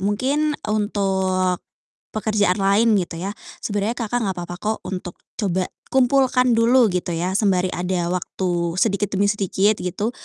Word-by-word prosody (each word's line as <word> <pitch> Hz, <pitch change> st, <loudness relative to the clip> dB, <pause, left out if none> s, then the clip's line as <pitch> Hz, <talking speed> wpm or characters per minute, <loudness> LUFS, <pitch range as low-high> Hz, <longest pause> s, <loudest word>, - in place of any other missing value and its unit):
mungkin 270 Hz, +10 st, 0 dB, 0.2 s
untuk 190 Hz, -3 st, 0 dB, 0.5 s
pekerjaan 210 Hz, -3 st, +1 dB
lain 205 Hz, +4 st, +4 dB
gitu 180 Hz, -4 st, -1 dB
ya 195 Hz, +4 st, -4 dB, 0.2 s
sebenarnya 210 Hz, +3 st, -2 dB
Kakak, 240 Hz, +1 st, -1 dB
gak 195 Hz, -3 st, -2 dB
papa 175 Hz, 0 st, -5 dB
kok 215 Hz, +1 st, -1 dB
untuk 180 Hz, -2 st, -5 dB, 0.2 s
coba 185 Hz, -3 st, 0 dB, 0.3 s
kumpulkan 255 Hz, -1 st, +3 dB
dulu 235 Hz, +1 st, +5 dB
gitu 180 Hz, -1 st, -2 dB
ya 180 Hz, +3 st, -1 dB
sembari 190 Hz, -4 st, +2 dB
ada 180 Hz, -1 st, -1 dB
waktu 175 Hz, -2 st, -2 dB
sedikit 200 Hz, -1 st, +1 dB
demi 200 Hz, +1 st, +2 dB
sedikit 200 Hz, +1 st, +1 dB
gitu, 195 Hz, +6 st, -2 dB
200 Hz, 140 wpm, -22 LUFS, 185-220 Hz, 0.5 s, dulu